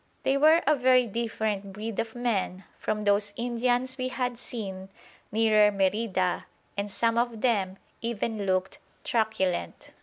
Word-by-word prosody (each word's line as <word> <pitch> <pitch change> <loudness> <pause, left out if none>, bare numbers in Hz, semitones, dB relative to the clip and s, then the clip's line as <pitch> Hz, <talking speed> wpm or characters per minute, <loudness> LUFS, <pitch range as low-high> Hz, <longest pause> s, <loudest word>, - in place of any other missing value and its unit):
They 270 - +2
were 315 +4 +5
a 305 +2 +4
very 255 -1 +4
different 215 -3 -2
breed 215 +1 -5
of 225 0 -3
men 205 -6 -1 0.2
from 210 0 -2
those 205 0 +2
Indians 245 +2 0
we 255 - 0
had 250 -2 -2
seen 195 -6 -6 0.4
nearer 215 -1 +5
Merida, 195 -2 0 0.3
and 200 +1 -2
some 230 +3 +1
of 235 -2 -1
them 195 -6 +1 0.2
even 225 -2 -2
looked 185 0 0 0.2
truculent. 215 - -1
220 Hz, 140 wpm, -27 LUFS, 200-240 Hz, 0.4 s, were